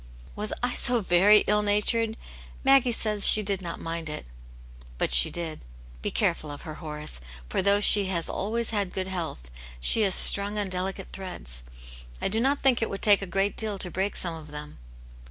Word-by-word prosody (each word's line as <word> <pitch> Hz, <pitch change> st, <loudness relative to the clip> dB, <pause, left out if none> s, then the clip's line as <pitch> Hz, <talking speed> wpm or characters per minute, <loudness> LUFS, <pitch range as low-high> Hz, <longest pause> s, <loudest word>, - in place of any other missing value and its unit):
"Was 210 Hz, +1 st, -4 dB
I 245 Hz, 0 st, -1 dB
so 240 Hz, -1 st, 0 dB
very 195 Hz, +3 st, +4 dB
ill 210 Hz, 0 st, 0 dB
natured? 220 Hz, +2 st, 0 dB, 0.5 s
Maggie 270 Hz, -2 st, +3 dB
says 215 Hz, -3 st, +2 dB
she 215 Hz, -, +8 dB
did 195 Hz, -1 st, -3 dB
not 170 Hz, -2 st, -8 dB
mind 165 Hz, -1 st, -6 dB
it." 150 Hz, -, -8 dB, 0.7 s
"But -, -, -2 dB
she -, -, +9 dB
did. 165 Hz, -3 st, -7 dB, 0.4 s
Be -, -, -3 dB
careful 155 Hz, -, -2 dB
of 145 Hz, 0 st, -10 dB
her, 155 Hz, -, -8 dB
Horace, 150 Hz, -, -8 dB, 0.3 s
for -, -, -2 dB
though 200 Hz, +1 st, +2 dB
she 205 Hz, -1 st, +6 dB
has 170 Hz, -3 st, -2 dB
always 230 Hz, +4 st, -3 dB
had 200 Hz, -4 st, -3 dB
good 190 Hz, -, -4 dB
health, 165 Hz, -, -7 dB, 0.3 s
she 140 Hz, -, +4 dB
is 195 Hz, -3 st, +3 dB
strung 205 Hz, +1 st, +4 dB
on 205 Hz, -2 st, -3 dB
delicate 190 Hz, +1 st, -5 dB
threads. 65 Hz, -, -1 dB, 0.6 s
I -, -, -3 dB
do 220 Hz, +3 st, -1 dB
not 275 Hz, +4 st, -1 dB
think 260 Hz, -4 st, +2 dB
it 225 Hz, -, -2 dB
would 195 Hz, -, -8 dB
take 205 Hz, -2 st, +4 dB
a 195 Hz, -, -6 dB
great 195 Hz, +3 st, -2 dB
deal 215 Hz, -2 st, -4 dB
to 180 Hz, -2 st, -1 dB
break 195 Hz, +4 st, -3 dB
some 170 Hz, -2 st, -1 dB
of 160 Hz, -1 st, -11 dB
them." 150 Hz, 0 st, -10 dB
195 Hz, 195 wpm, -25 LUFS, 170-210 Hz, 0.7 s, she